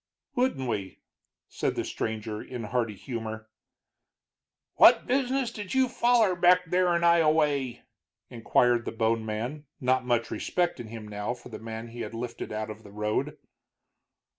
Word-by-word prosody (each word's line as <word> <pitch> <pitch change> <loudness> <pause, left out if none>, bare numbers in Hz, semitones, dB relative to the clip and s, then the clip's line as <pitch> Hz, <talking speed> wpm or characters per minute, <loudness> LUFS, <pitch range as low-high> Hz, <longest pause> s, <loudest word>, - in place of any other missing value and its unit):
"Wouldn't 245 - 0
we?" 100 -5 -3 0.5
said - - -2
the - - -2
stranger, 110 -1 -4
in 125 -2 -7
hearty 115 0 -1
humor. 110 0 -6 1.3
"What - - +7
business 260 -1 0
did 205 0 -6
you 260 -1 +4
foller 235 -5 +3
back 180 +1 +5
there 180 0 +2
in 170 - 0
Ioway?" 155 -6 +3 0.4
inquired 120 0 +2
the - - -3
bone 115 0 +1
man, 120 +8 -4
not 130 -1 +2
much 120 -2 0
respect 175 -6 -1
in 120 - -6
him 110 -1 -8
now 105 +3 -3
for 125 - -13
the - - -8
man 115 +1 -7
he 120 +1 -8
had 115 - -5
lifted 120 +1 -5
out 110 0 -3
of 105 +1 -10
the 105 - -14
road. 105 +1 -2
120 Hz, 155 wpm, -28 LUFS, 110-170 Hz, 1.3 s, What